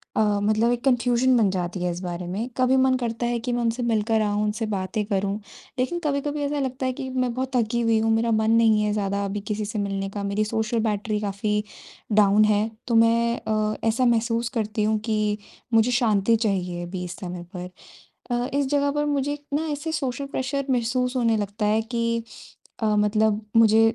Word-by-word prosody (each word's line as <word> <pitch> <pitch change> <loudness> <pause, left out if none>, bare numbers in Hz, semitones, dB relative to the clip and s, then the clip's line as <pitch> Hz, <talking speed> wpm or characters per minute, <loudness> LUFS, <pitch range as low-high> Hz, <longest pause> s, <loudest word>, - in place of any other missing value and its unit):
अ, - - +3 0.2
मतलब 215 +3 +2
एक 245 0 -2
कन्फ्यूजन 250 -1 +3
बन 215 -4 +3
जाती 180 0 -3
है 180 - 0
इस 175 - -5
बारे 175 -1 -4
में। 210 +7 -3
कभी 255 0 +3
मन 260 0 +4
करता 235 -1 -2
है 240 0 0
कि 245 +2 -3
मैं 240 - 0
उनसे 235 +1 -1
मिलकर 225 -1 +1
आऊँ, 205 0 0
उनसे 215 +2 -1
बातें 205 0 -2
करूँ, 200 -1 -1 0.4
लेकिन 300 +8 0
कभी-कभी 290 0 -1
ऐसा 290 +1 -1
लगता 260 -1 -2
है 255 - 0
कि 260 +1 -6
मैं 255 -2 -1
बहुत 260 +1 -3
थकी 235 0 +1
हुई 230 -1 +3
हूँ 225 0 +1
मेरा 230 +1 +1
मन 220 0 +2
नहीं 225 -2 +4
है 210 - +1
ज़्यादा 200 -1 -1
अभी 200 +1 -3
किसी 210 0 -2
से 210 +1 -4
मिलने 195 -1 -2
का 200 +1 -5
मेरी 200 +2 0
सोशल 220 +2 -1
बैटरी 210 +1 -1
काफ़ी 210 +1 -1 0.5
डाउन 210 0 +5
है, 210 +1 +2 0.2
तो 235 - +1
मैं 230 +1 +3
अ, 215 +1 0
ऐसा 230 +3 +2
महसूस 235 0 +1
करती 215 -1 -1
हूँ 215 +1 +2
कि 215 -2 0 0.4
मुझे 225 +2 +4
शांति 230 -3 +3
चाहिए 185 -6 -1
अभी 180 +1 -5
इस 175 - -7
समय 180 -3 -6
पर। 180 0 -5 0.6
अ, 240 +1 0
इस 280 -1 +1
जगह 285 +1 +1
पर 295 +1 0
मुझे 285 -1 0
एक 290 0 -7
ना 315 +2 0
ऐसे 295 +3 -4
सोशल 275 -3 -2
प्रेशर 275 +1 -2
महसूस 250 +1 0
होने 230 -3 +2
लगता 210 +1 -2
है 215 +1 +3
कि 230 0 -1 0.6
अ, - - +2
मतलब 210 0 +2 0.2
मुझे 220 -1 +6
225 Hz, 205 wpm, -24 LUFS, 210-245 Hz, 0.6 s, मुझे